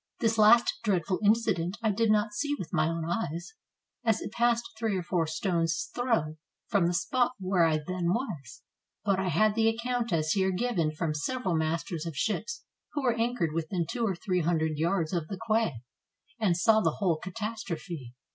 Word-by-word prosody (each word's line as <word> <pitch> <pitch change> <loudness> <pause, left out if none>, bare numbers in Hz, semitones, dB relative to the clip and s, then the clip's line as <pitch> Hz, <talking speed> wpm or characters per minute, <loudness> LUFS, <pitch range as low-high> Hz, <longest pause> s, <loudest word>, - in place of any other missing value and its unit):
This 225 -1 +1
last 230 +3 +6
dreadful 185 -3 0
incident 205 -5 +2
I 220 - +3
did 225 +2 +1
not 210 0 +2
see 290 +7 -1
with 170 - -7
my - - +3
own 165 -1 -2
eyes, 175 - -3 0.5
as 225 -2 +2
it - - -6
passed 235 0 +1
three 220 -4 0
or 180 - -3
four 170 -2 0
stones' 165 0 -1
throws 225 -11 0 0.3
from 195 -6 +3
the 175 - 0
spot 250 +7 +1
where 185 -2 +2
I 160 -1 +2
then 175 +3 -3
was; 185 - -4 0.4
but 195 -2 +2
I 190 - -1
had 215 +4 +3
the 225 +1 +2
account 235 +1 -1
as 155 -2 +1
here 190 +1 +2
given 185 -6 0
from 155 0 -2
several 185 - -2
masters 160 +1 -2
of 160 -5 -6
ships, 220 - -2 0.3
who 290 -2 -2
were 245 -3 +3
anchored 230 -9 0
within 165 +2 -1
two 235 +7 -3
or 200 -5 +1
three 180 +1 -1
hundred 160 -2 0
yards 170 0 0
of 170 -3 -1
the 195 - -5
quay, 215 - +1 0.6
and 190 -6 +2
saw 220 +5 +4
the - - +1
whole 180 -6 +1
catastrophe. 175 - -5
190 Hz, 185 wpm, -29 LUFS, 165-225 Hz, 0.6 s, last